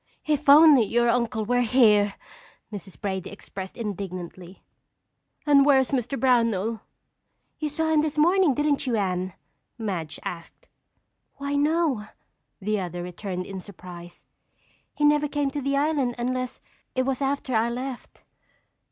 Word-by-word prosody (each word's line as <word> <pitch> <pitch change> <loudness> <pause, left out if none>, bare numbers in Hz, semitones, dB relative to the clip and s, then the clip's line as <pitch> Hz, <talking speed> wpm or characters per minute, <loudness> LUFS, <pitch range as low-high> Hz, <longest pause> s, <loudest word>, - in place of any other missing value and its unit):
"If 300 -2 0
only 295 -2 +8
your 235 +3 +1
uncle 230 -2 0
were 245 +2 +2
here!" 215 -4 +4 0.6
Mrs. 195 -2 -9
Brady 190 -3 -3
expressed 195 -1 -9
indignantly. 185 -4 -6 0.8
"And 285 -2 +6
where 280 -1 +5
is 265 -1 +1
Mr. 265 0 -1
Brownell?" 230 -4 +1 0.8
"You 305 - -2
saw 320 +2 0
him 310 - +4
this 300 -1 -3
morning, 345 -1 +4
didn't 295 -1 0
you, 240 - +1
Anne?" 185 -3 -1 0.4
Madge 185 -9 -4
asked. 170 -1 -8 0.7
"Why, 280 +1 -4
no," 290 -6 +1 0.5
the 210 +1 -1
other 175 -1 -5
returned 180 +1 -5
in 190 -1 -7
surprise. 175 -3 -11 0.7
"He 295 - +1
never 295 0 +4
came 290 -1 -1
to 290 - -4
the 275 +1 0
island 280 -4 +1
unless 255 +1 -3 0.3
it 255 - +2
was 270 0 -2
after 275 -1 -1
I 225 +1 +2
left." 250 +1 -7
245 Hz, 140 wpm, -25 LUFS, 195-280 Hz, 0.8 s, only